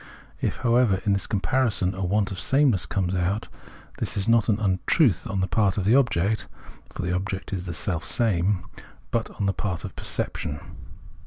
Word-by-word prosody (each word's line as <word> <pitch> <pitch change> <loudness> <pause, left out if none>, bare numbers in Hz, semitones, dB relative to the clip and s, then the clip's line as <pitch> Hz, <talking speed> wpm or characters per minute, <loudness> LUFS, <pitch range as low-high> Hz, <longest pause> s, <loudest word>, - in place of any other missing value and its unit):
If, - - -1
however, 120 -5 +4
in 100 - +3
this 100 - -1
comparison 105 -2 +1
a 95 0 -4
want 100 +2 +1
of 95 - -5
sameness 130 - +2
comes 95 -2 -1
out, 95 +3 -1 0.5
this - - -1
is 100 - 0
not 115 -1 +4
an 105 0 +2
untruth 100 - +2
on 95 -1 -1
the 95 - +1
part 100 -4 +1
of 95 - -1
the 105 - +4
object 110 -6 +2 0.4
(for - - -5
the 90 0 -1
object 95 +1 -3
is 90 -1 -4
the 85 - -3
self 85 -1 -1
same), 100 -5 +1 0.5
but 115 -1 0
on 100 - 0
the 95 - +2
part 90 -5 -3
of - - -8
perception. 75 0 -3
100 Hz, 185 wpm, -25 LUFS, 90-110 Hz, 0.5 s, however